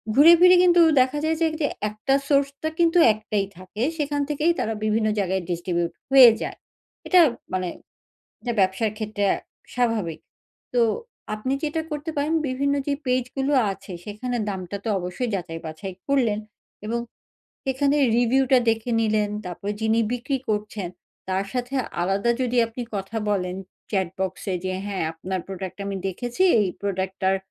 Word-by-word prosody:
ঘুরে 310 +5 +9
ফিরে 360 +1 +8
কিন্তু 350 -1 +6 0.2
দেখা 260 +3 +2
যায় 320 +1 +1
যে 325 - +4
তে 290 - +3 0.2
এক 210 - -7
টা 270 - +5
সোর্সটা 280 +2 +1
কিন্তু 340 +1 +4 0.2
একটাই 215 -2 -2
থাকে। 185 +4 -8 0.2
সেখান 290 -1 -1
থেকেই 300 +3 +2
তারা 225 - -1
বিভিন্ন 215 0 +1
জায়গায় 190 -1 0
distribute 175 0 -1 0.2
হয়ে 260 -3 +10
যায়। - - -4 0.5
এটা 365 -1 +7 0.3
মানে 185 -1 0 0.7
এটা 240 - -2
ব্যবসার 190 +4 +2
ক্ষেত্রে 215 -2 -2
আ - - -3 0.4
স্বাভাবিক। 220 -10 0 0.5
তো 240 - +4 0.5
আপনি 215 +5 -3
যেটা 310 +1 -1
করতে 300 +2 -4
পারেন, 295 +3 0
বিভিন্ন 280 +2 0
যে 285 - +2
পেজগুলো 255 +2 0 0.2
আছে 195 0 -10
সেখানে 240 +4 -4
দামটা 190 0 -4
তো - - -2
অবশ্যই 180 +7 -3
যাচাই-বাছাই 170 +1 -5
করলেন, 250 -7 +2 0.5
এবং 235 +2 -1 0.6
সেখানে 275 +2 +1 0.2
রিভিউটা 260 +2 +4
দেখে 225 +2 -1
নিলেন, 215 -1 +1 0.2
তারপরে 195 +3 -4
যিনি 220 +1 +2
বিক্রি 255 +3 -1
করছেন 210 -3 -2 0.4
তার 190 +1 0
সাথে 250 +1 -3 0.3
আলাদা 195 +6 +1
যদি 250 0 0
আপনি 235 +2 -7
কথা 195 +3 -4
বলেন 180 -2 -1 0.4
চ্যাটবক্সে 190 0 -2
যে, 185 - -1
"হ্যাঁ 200 -4 -2
আপনার 185 +3 -4
প্রোডাক্ট 190 -1 -6
আমি 200 - -3
দেখেছি" 245 - -2 0.2
এই 205 - +2
প্রোডাক্টটার 190 -1 0
220 Hz, 150 wpm, -24 LUFS, 190-270 Hz, 0.7 s, হয়ে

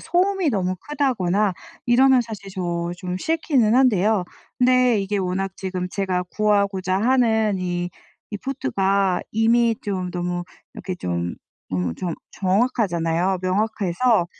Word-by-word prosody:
소음이 370 0 +1
너무 185 -7 0
크다거나 215 -9 +1 0.3
이러면 260 +1 +5
사실 215 -4 -8
저 175 -2 -2
좀 180 0 -4
싫기는 275 - +2
한데요. 215 -6 +3 0.3
근데 250 -2 +4
이게 200 +1 -1
워낙 190 +1 -2
지금 185 -2 -4
제가 185 -2 -1
구하고자 200 -3 +1
하는 220 -5 +2
이, 175 -1 -2 0.4
이 205 - -4
포트가 195 -7 0
이미 230 +1 +3
좀 185 -3 -3
너무 175 0 -3 0.3
이렇게 185 - -5
좀 85 - -3 0.4
어 90 -2 -1
좀 175 -3 -3 0.2
정확하잖아요. 185 -4 +1
명확해서 205 +1 +1
195 Hz, 265 characters per minute, -22 LUFS, 180-235 Hz, 0.4 s, 이러면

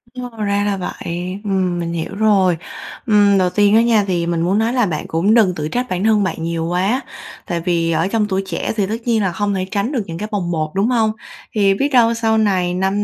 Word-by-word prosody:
Ồ, 250 0 -5
ra 200 0 +1
là 200 -1 0
vậy, 180 +1 -5
ừm, 185 -3 0
mình 170 0 -3
hiểu 170 +4 -4
rồi. 195 -5 +3 0.5
Ừm, 205 -3 +4
đầu 180 -1 +2
tiên 205 +2 +3
á 225 - +6
nha 230 -3 +3
thì 175 -3 0
mình 170 -1 -1
muốn 180 +4 +1
nói 230 +2 0
là 245 -3 +2
bạn 160 -6 -3
cũng 180 +7 +1
đừng 200 -6 +4
tự 150 0 -3
trách 245 +8 -2
bản 185 +2 -2
thân 215 -2 +3
bạn 165 -3 -3
nhiều 165 -1 -2
quá. 190 +9 0 0.5
Tại 175 -3 -2
vì 170 -1 0
ở 165 - +1
trong 210 0 0
tuổi 195 -1 -1
trẻ 175 - -3
thì 200 -3 0
tất 220 - -2
nhiên 230 -3 +2
là 185 - 0
hông 205 -1 -1
thể 185 -1 -1
tránh 205 +4 -1
được 245 -8 -1
những 165 -2 -7
cái 210 - -4
bồng 180 -4 -2
bột, 155 -2 -2
đúng 195 +4 +1
hông? 225 -3 +2 0.4
Thì 200 -2 +3
biết 275 +8 0
đâu 235 -2 +5
sau 225 -1 +1
này 185 -4 +1
5 190 +3 0
195 Hz, 250 wpm, -18 LUFS, 175-215 Hz, 0.5 s, á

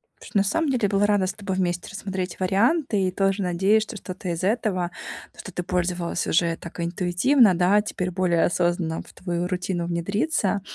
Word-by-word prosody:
Потому - - -13
что 215 - +1
на - - +4
самом 310 +10 0
деле 245 -5 +1
была 200 +1 +2
рада 205 -2 +2
с 185 - -2
тобой 195 -2 -4
вместе 175 -1 -1
рассмотреть 190 -3 -4
варианты 210 - +2
и - - -1
тоже 195 +1 0
надеюсь, 190 +5 +3
что 220 - -8
что-то 185 -1 -6
из 170 +1 -3
этого, 195 -4 0 0.5
что - - -8
ты 180 - -2
пользовалась 180 -1 -1
уже 165 0 +2
так 170 - -10
интуитивно, 180 +7 +3
да, 185 +4 +4
теперь 180 -3 -3
более 175 -2 +1
осознанно 175 -2 0
в - - -16
твою 175 -1 -3
рутину 180 -1 -2
внедрится 200 - 0
185 Hz, 185 wpm, -24 LUFS, 175-205 Hz, 0.5 s, на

